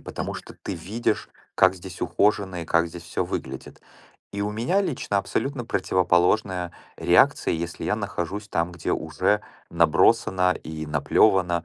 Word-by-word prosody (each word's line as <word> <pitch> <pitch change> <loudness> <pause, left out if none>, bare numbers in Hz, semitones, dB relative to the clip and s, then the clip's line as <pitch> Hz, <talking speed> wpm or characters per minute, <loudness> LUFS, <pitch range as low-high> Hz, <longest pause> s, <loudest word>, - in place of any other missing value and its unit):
потому - - -5
что - - -9
ты 100 - -4
видишь, 105 +6 -2 0.3
как 95 0 +5
здесь 90 0 -10
ухоженно 95 0 +1
и - - -7
как 85 +1 +2
здесь 85 +1 -9
всё - - -2
выглядит. 65 0 -6 0.5
И 100 - -4
у 105 - -1
меня 120 - +1
лично 130 - -1
абсолютно 135 +4 -2
противоположная 90 -1 +1 0.2
реакция, - - +3
если 85 0 -4
я - - +1
нахожусь 100 +5 -4
там, 85 0 -1
где 85 - -3
уже - - 0 0.3
набросано 90 +3 +3
и 80 0 -7
наплёвано, 90 +2 +2
90 Hz, 145 wpm, -25 LUFS, 85-105 Hz, 0.5 s, как